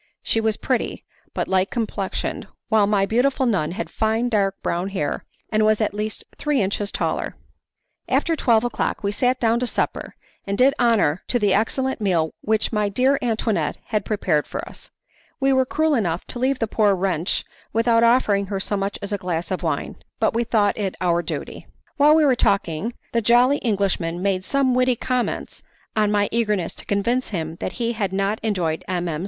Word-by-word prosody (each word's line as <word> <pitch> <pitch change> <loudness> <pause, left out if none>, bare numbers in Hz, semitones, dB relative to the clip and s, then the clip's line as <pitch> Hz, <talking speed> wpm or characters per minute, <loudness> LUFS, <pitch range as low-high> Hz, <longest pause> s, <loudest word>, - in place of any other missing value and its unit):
she 225 - +1
was 220 -1 0
pretty, 255 -3 -2 0.3
but - - -1
light 190 +1 +2
complexioned, 215 -4 -3 0.2
while 215 -3 +4
my 200 -1 +2
beautiful 260 +5 +1
nun 180 -9 0
had 225 - -4
fine 225 +2 0
dark 200 -3 +1
brown 175 +3 -1
hair 165 -7 -2 0.3
and 215 0 +2
was 215 0 +3
at 215 -2 0
least 210 +1 -4 0.2
three 295 -3 +1
inches 200 0 -1
taller. - - -2 0.7
After 330 - +2
twelve 235 -6 +3
o'clock 240 -2 -2
we 200 - 0
sat 250 +4 +1
down 230 0 +2
to 250 - -1
supper, - - -2 0.3
and 200 0 -1
did 265 +4 +5
honour 210 -9 +3
to 245 - +1
the 205 -4 +2
excellent 260 +4 0
meal 170 -6 +1
which 220 +1 0
my 210 -1 +1
dear 260 +7 +2
Antoinette 225 -3 0
had 215 -2 0
prepared 180 -8 0
for - - -5
us. - - -13 0.5
We 270 0 +3
were 260 -1 +2
cruel 315 +2 +1
enough 180 - 0
to 245 - -2
leave 265 +1 +1
the 225 - 0
poor 210 -2 +2
wretch 180 -2 -1 0.3
without 230 +1 +3
offering 220 -5 +3
her 195 0 -3
so 205 - -2
much 195 0 -2
as 200 - -4
a 200 - -1
glass 175 0 -3
of 185 - -2
wine, 160 -4 -2 0.2
but - - +2
we 235 +1 +1
thought 210 -2 +1
it 195 -3 -2
our 175 -2 +2
duty. - - -6 0.3
While 295 +2 +6
we 315 -1 +4
were 265 -3 +4
talking, 200 -1 0 0.2
the 230 - +2
jolly 245 +5 +4
Englishman 190 -7 -1
made 190 -2 0
some 275 +1 +2
witty 255 0 +3
comments 250 +1 -2 0.3
on 215 -1 +2
my 205 -1 +2
eagerness 210 -5 0
to - - -10
convince 235 +6 0
him 165 -4 -4
that 185 - -4
he 235 -1 -1
had 205 -4 -2
not 195 +2 0
enjoyed 180 -7 -1
M. 180 -1 -1
M. 155 -2 -2
215 Hz, 195 wpm, -22 LUFS, 195-240 Hz, 0.7 s, While